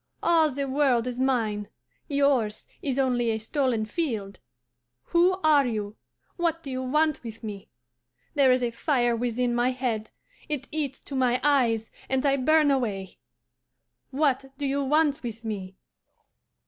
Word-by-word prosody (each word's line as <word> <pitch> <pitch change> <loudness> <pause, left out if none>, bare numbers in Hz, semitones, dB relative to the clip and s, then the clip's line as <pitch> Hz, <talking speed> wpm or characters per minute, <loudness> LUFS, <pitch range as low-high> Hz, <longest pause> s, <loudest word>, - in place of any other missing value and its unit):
All 325 -2 +4
the 280 0 -3
world 260 -4 +2
is 250 0 -4
mine; 225 -6 0 0.4
yours 280 -7 +1 0.2
is 270 -2 -2
only 250 -3 +1
a 220 - 0
stolen 235 -1 0
field. 215 - -3 0.7
Who 350 +2 +4
are 295 -4 +5
you? 210 -2 -3 0.4
What 335 -2 0
do 275 - -6
you 255 0 -3
want 300 +3 +1
with 230 0 -9
me? 205 -3 -7 0.6
There 275 -3 +5
is 255 0 +2
a 240 - 0
fire 240 -1 +1
within 240 +1 -1
my 240 +1 +2
head, 245 -4 -2 0.4
it 285 -3 -3
eats 290 -3 -2
to 280 - -8
my 250 -1 +2
eyes, 240 -6 +2 0.2
and 265 +1 +1
I 275 -1 +3
burn 300 +2 +4
away. 205 -8 -2 0.9
What 275 -1 +1
do 285 - -3
you 280 +1 0
want 300 +1 +2
with 230 -1 -7
me? 190 -3 -5
255 Hz, 150 wpm, -26 LUFS, 230-285 Hz, 0.9 s, are